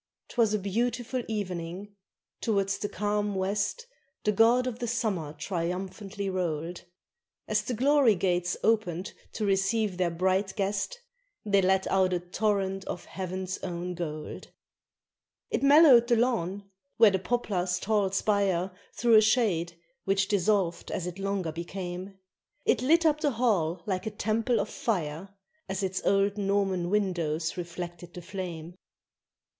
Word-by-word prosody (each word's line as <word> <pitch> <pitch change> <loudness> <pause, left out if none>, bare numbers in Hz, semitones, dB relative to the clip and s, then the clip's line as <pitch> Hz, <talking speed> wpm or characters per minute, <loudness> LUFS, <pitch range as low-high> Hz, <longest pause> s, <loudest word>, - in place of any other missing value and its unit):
_ - - -56
'Twas 230 -4 +2
a 215 - +2
beautiful 240 +5 -1
evening: 185 -2 -4 0.5
towards 200 -3 0
the 205 - -2
calm 205 -1 -1
west 205 - -1 0.4
The 210 - +3
god 230 +4 +4
of 245 -2 -4
the 240 - -2
summer 210 -10 -1
triumphantly 190 +5 -4
rolled; 175 -2 -3 0.6
As - - +1
the 245 - -3
glory 270 -2 +4
gates 175 -1 0
oped 200 -5 0 0.2
to 215 - -2
receive 195 0 +1
their 180 -1 +1
bright 190 +3 0
guest 200 - -2 0.5
They 200 -2 +3
let 190 0 +2
out 190 -1 +2
a 180 - +1
torrent 195 +1 -1
of - - -5
heaven's 185 0 -4
own 180 0 -4
gold. 155 -3 -6 1.0
It - - 0
mellowed 280 -4 +7
the 240 - +4
lawn, 205 -5 0 0.3
where 220 -3 +7
the 190 - 0
poplar's 185 -4 -1
tall 205 -2 +1
spire 195 -2 +1 0.2
Threw 235 -1 +3
a 215 - +9
shade, 190 -7 +1 0.3
which 195 0 +2
dissolved 200 -4 +1
as 175 - -3
it 180 +1 -6
longer 195 -4 -1
became. 180 +3 -6 0.5
It - - +3
lit 330 +6 +4
up 305 -1 +3
the 290 -4 +1
hall 185 -8 +1
like 190 +1 -2
a - - +1
temple 220 +3 0
of - - -1
fire 175 -4 -2 0.4
As 190 +1 -2
its 190 0 -1
old 200 +1 +2
Norman 195 -3 0
windows 170 -6 0
reflected 175 0 -7
the 180 - -8
flame. 175 -3 -6
195 Hz, 145 wpm, -28 LUFS, 180-215 Hz, 1.0 s, a